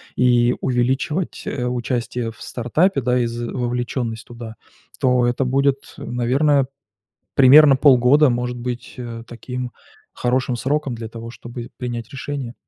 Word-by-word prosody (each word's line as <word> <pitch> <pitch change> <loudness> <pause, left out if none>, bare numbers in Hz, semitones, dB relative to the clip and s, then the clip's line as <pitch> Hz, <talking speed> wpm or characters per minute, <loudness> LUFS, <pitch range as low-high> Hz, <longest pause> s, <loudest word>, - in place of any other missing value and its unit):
и 120 -1 +3
увеличивать, 130 +7 -1
э, 125 - -3
участие 120 -1 -2
в - - -18
стартапе, 140 +7 0
да, 125 +1 +1
и 120 - +1
з 120 0 -4
вовлеченность 120 -2 -3
туда, 115 -2 -9 0.5
то 125 -2 +3
это 120 +2 0
будет, 135 +1 0
наверное, 130 +3 +1 0.7
примерно 140 +1 +8
полгода, 130 +1 +5
может 125 0 -2
быть, 125 0 -5
э, 120 -2 -7
таким 125 +1 -6 0.4
хорошим 125 0 0
сроком 140 -1 -1
для 115 -1 -6
того, 115 0 -8
чтобы 120 0 -9
принять 120 -2 -5
решение. 135 -3 -5
125 Hz, 135 wpm, -21 LUFS, 120-130 Hz, 0.7 s, примерно